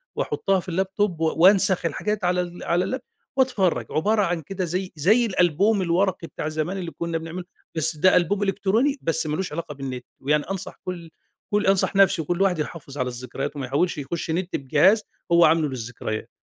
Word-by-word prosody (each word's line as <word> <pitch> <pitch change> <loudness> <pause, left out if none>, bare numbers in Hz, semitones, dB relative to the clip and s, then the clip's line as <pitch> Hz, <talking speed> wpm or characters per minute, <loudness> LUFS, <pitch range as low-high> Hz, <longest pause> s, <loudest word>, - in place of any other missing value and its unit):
وأحطها 195 -1 0
في 180 +1 -7
الLaptop 195 +2 -20 0.2
و 165 - -1 0.2
وأنسخ 190 -2 +5
الحاجات 210 +6 -2
على 180 0 +2
ال 175 0 -7
على 175 +2 +1
الLap - - -18 0.4
وأتفرّج، 245 -9 +2
عبارة 210 +7 +2
عن 175 -4 0
كده 185 +4 -4
زي 185 +2 -3
زي 210 +11 +4
الألبوم 190 +1 +2
الورقي 180 0 0
بتاع 155 - -5
زمان 155 +5 -2
اللي 175 -3 -5
كنّا 170 0 -3
بنعمله 165 +3 -6 0.3
بس 160 0 0
ده 185 +5 +5
ألبوم 195 +4 +2
إلكتروني 210 +8 +1
بس 160 -1 -1
ما 150 - -1
لوش 190 +1 -3
علاقة 155 -2 -5
بالنت، 130 -3 -6
ويعني 150 +2 +1
أنصح 195 -1 -6
كلّ 175 -3 -6 0.4
كلّ 210 0 +2
أنصح 195 0 +2
نِفْسي 195 -3 +5
وكلّ 175 +4 -2
واحد 185 -4 +2
يحافظ 150 -2 -6
على 130 - 0
الذكريات 125 +3 -5
وما 140 -2 -4
يحاولش 150 +7 0
يخش 160 +4 -4
نت 175 +2 -2
بجهاز 155 - +3 0.3
هو 170 0 +7
عامله 160 0 +3
للذكريات. 115 -3 -5
175 Hz, 185 wpm, -24 LUFS, 155-195 Hz, 0.4 s, هو